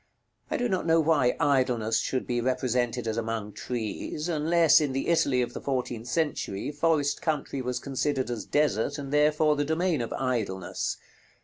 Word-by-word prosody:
I - - -1
do 245 - 0
not 185 -5 -1
know 165 0 +5
why 150 -6 +2
Idleness 125 -7 +2
should 130 - -2
be 120 -1 -1
represented 125 -1 0
as 110 0 -2
among 110 -2 -3
trees, 120 - -4
unless, 165 0 +4
in 145 -3 -1
the 135 +4 -2
Italy 140 -6 +3
of 120 - -5
the - - -6
fourteenth 125 -4 -3
century, 145 -6 -1
forest 145 -1 +1
country 145 -4 -2
was 125 0 -2
considered 135 -1 -1
as 115 -4 -3
desert, 145 -1 +1
and 140 -1 -6
therefore 150 +1 +3
the 145 - 0
domain 160 0 0
of 115 - -4
Idleness. 110 -8 -2
135 Hz, 170 wpm, -27 LUFS, 120-150 Hz, -, know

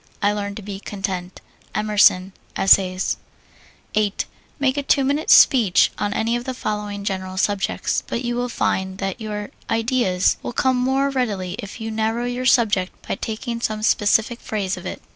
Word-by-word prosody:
I 205 0 +2
learn 200 -1 -3
to 215 - -8
be 195 -1 -6
content. 190 -3 -5 0.3
EMERSON, 205 -3 +3 0.2
Essays. 190 -1 +3 0.8
8. 210 -1 0 0.3
Make 270 -1 +1
a 285 - 0
two 275 0 +2
minute 285 +4 0
speech 220 -9 +6
on 205 -1 -1
any 225 +3 0
of 240 - -3
the 260 - -4
following 210 -3 -4
general 190 -1 -3
subjects, 200 0 0
but 245 - -3
you 240 0 -1
will 245 0 -1
find 190 -4 -1
that 195 +3 -4
your 210 -1 -5 0.2
ideas 225 -5 +1
will - - -5
come 260 0 +2
more 265 +2 +1
readily 205 -9 -2
if 205 0 -7
you 225 0 -4
narrow 225 +2 -1
your 245 +1 -2
subject 215 -7 +1
by - - -1
taking 230 +3 -4
some 215 -2 -2
specific 220 +2 +2
phase 195 -4 -2
of 185 0 -8
it. - - -7
215 Hz, 170 wpm, -22 LUFS, 195-240 Hz, 0.8 s, speech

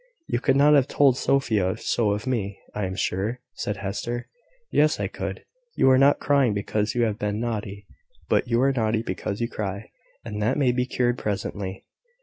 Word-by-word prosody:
"You 120 - -1
could 130 - +2
not 145 +2 +6
have 140 -3 +5
told 140 -4 +4
Sophia 110 -9 +1
so 110 -3 0
of 105 +3 -4
me, 105 -6 -2 0.2
I 105 - -2
am 95 0 -4
sure," 105 +6 -1
said 105 - -3
Hester. 120 +5 -4 0.4
"Yes, 150 +1 +3
I - - 0
could; - - -5 0.3
you 130 - +5
are 130 - +6
not 140 +1 +5
crying 135 -7 +2
because 105 +2 -1
you 120 - +2
have 110 -2 -1
been 105 0 -1
naughty, 105 -3 -4 0.4
but - - +2
you 120 0 +2
are 135 - +4
naughty 110 -3 0
because 100 -2 -4
you 115 - +1
cry; 100 -1 -5 0.3
and 105 -2 -4
that 115 +7 +1
may 135 -4 +3
be 125 +1 -1
cured 125 -1 0
presently." 100 -2 -4
115 Hz, 190 wpm, -25 LUFS, 105-125 Hz, 0.4 s, not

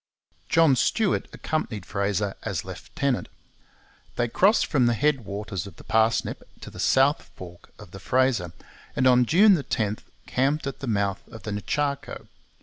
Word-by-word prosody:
John 165 -5 +5
Stuart 210 - +1
accompanied 110 -11 -3
Fraser 100 0 -1
as 90 -4 -4
lieutenant. 125 - -3 0.9
They 120 - 0
crossed 195 - +3
from 130 -6 +2
the 120 - +2
head 140 -2 +1
waters 100 -2 -5
of 95 - -12
the - - -14
Parsnip 110 0 +1 0.2
to - - -9
the - - -11
south 135 +3 +2
fork 90 -1 -12
of 105 -5 -13
the 95 - -9
Fraser, 120 -5 +1 0.4
and 130 - +1
on 125 -1 +5
June 185 - +5
10 110 -5 -1 0.3
camped 140 +4 0
at 135 - -5
the 140 - -6
mouth 100 -3 0
of 110 -4 -12
the 110 - -5
Nechaco. 140 +7 -3
120 Hz, 155 wpm, -25 LUFS, 100-140 Hz, 0.9 s, John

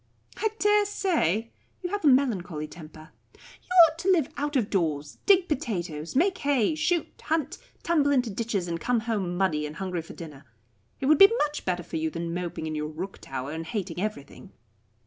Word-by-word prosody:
"I 440 - +1
dare 415 -1 +3
say. 230 - 0 0.3
You 355 - -3
have 410 -2 -2
a - - +4
melancholy 195 - +2
temper. 155 -1 -12 0.2
You - - -21 0.2
ought 315 +1 -8
to 375 - -1
live 325 -7 +2
out 290 +1 -3
of 235 -6 +1
doors, 150 -6 -1
dig 375 -3 +5
potatoes, 175 - -3
make 370 +6 +2
hay, 280 -2 +2
shoot, 320 +2 +1 0.2
hunt, 315 -2 -1 0.2
tumble 305 -4 +2
into 250 -5 +2
ditches, 200 -3 -2
and 170 -1 -3
come 245 -2 +1
home 200 -6 -2
muddy 155 -6 +1
and 150 - -9
hungry 180 -1 -3
for 160 - -11
dinner. 150 -4 -10 0.6
It - - -1
would 300 +1 +5
be 390 +2 +9
much 295 0 -6
better 180 -1 -1
for 165 - -5
you 160 0 -1
than 170 +1 -4
moping 175 -2 -4
in 155 - -3
your 150 0 -2
rook 175 +6 -7
tower, 135 +1 -5
and 160 +1 -4
hating 175 0 -4
everything." 205 -10 -6
200 Hz, 190 wpm, -27 LUFS, -, 0.6 s, be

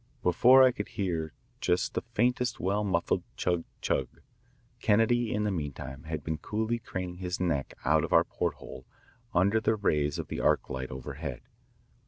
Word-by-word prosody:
Below 125 +9 +7
I 130 - +6
could 105 -4 -5
hear 85 -7 -2 0.3
just 90 +1 +1
the - - -1
faintest 125 +2 0
well 100 +3 0
muffled 90 -4 +1 0.2
chug 85 -2 0 0.2
chug. - - 0 0.7
Kennedy 115 +2 +3
in 105 - 0
the 105 - 0
meantime 70 -5 -5
had 80 -2 -4
been 80 +1 -3
coolly 110 +5 -1
craning 90 -5 -5
his 90 -1 -3
neck 80 -7 -1
out 80 +1 +4
of 85 - -3
our 85 - +6
porthole - - -5 0.5
under 100 +5 +3
the 110 +1 +2
rays 75 -8 +1
of - - -4
the - - -4
arc - - +2
light 65 0 -4
overhead. 70 +2 -6
90 Hz, 165 wpm, -29 LUFS, 80-105 Hz, 0.7 s, Below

